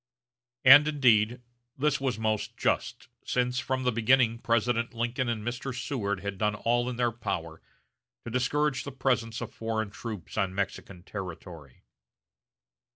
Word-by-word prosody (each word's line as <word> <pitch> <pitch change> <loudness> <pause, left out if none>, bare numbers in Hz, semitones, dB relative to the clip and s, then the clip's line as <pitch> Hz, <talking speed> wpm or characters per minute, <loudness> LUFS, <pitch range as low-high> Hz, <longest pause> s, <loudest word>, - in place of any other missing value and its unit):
And, 145 +3 +10
indeed, 120 -5 +3 0.4
this 150 +1 +1
was 130 -4 -1
most 110 -1 -2
just, - - -1 0.2
since 125 0 0
from 130 0 -2
the 125 - +2
beginning 115 0 +3
President 115 0 0
Lincoln 120 +2 -1
and 110 -2 -3
Mr. 125 +1 -4
Seward 100 -9 -2
had 100 -1 -5
done 105 -1 +1
all 120 +3 +1
in 125 - -4
their 120 0 +1
power 80 -8 -5 0.6
to 120 - -5
discourage 135 +3 0
the 140 - -6
presence 125 -4 -1
of 115 -1 -6
foreign 110 -2 -3
troops 110 -3 -6
on 95 -2 -1
Mexican 95 -2 -4
territory. 85 -8 -9
115 Hz, 145 wpm, -28 LUFS, 105-125 Hz, 0.6 s, And